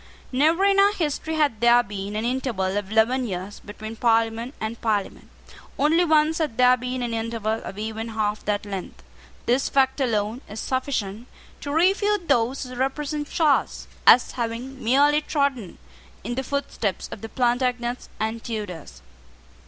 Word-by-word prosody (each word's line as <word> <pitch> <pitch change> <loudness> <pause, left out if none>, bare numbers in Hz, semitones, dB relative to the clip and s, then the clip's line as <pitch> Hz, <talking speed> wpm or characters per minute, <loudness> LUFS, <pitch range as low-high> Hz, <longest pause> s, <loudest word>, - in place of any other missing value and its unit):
Never 315 +8 +3
in 395 0 +4
our 400 +1 +5
history 320 -2 -2
had 285 -8 +1
there 240 0 +6
been 205 0 -6
an 215 +2 -1
interval 235 -7 -1
of 205 -1 -3
eleven 240 +3 +2
years 190 +1 -5
between 215 +2 -8
Parliament 230 +2 +1
and 220 +1 -5
Parliament. 210 -3 -2 0.5
Only 320 +5 +3
once 315 0 +3
had 300 -8 -2
there 250 0 +6
been 250 0 -4
an 235 -1 -3
interval 225 -1 -2
of 195 - -8
even 220 +1 -4
half 215 -1 -2
that 205 0 -1
length. 195 -3 -7 0.4
This 250 +3 +1
fact 270 0 +2
alone 225 -1 0
is 210 +2 -7
sufficient 245 -4 -2 0.3
to 285 - -5
refute 385 +3 +2
those 255 0 +1
who 255 -1 -8
represent 290 +3 -2
Charles 305 -4 +1 0.2
as 250 - +7
having 245 +3 -5
merely 285 +6 +4
trodden 280 - -1 0.5
in 240 - -3
the 260 - -1
footsteps 260 -7 -3
of - - -8
the 225 - -7
Plantagenets 245 0 -1
and 220 +1 -2
Tudors. 180 - -6
240 Hz, 155 wpm, -24 LUFS, 220-280 Hz, 0.5 s, as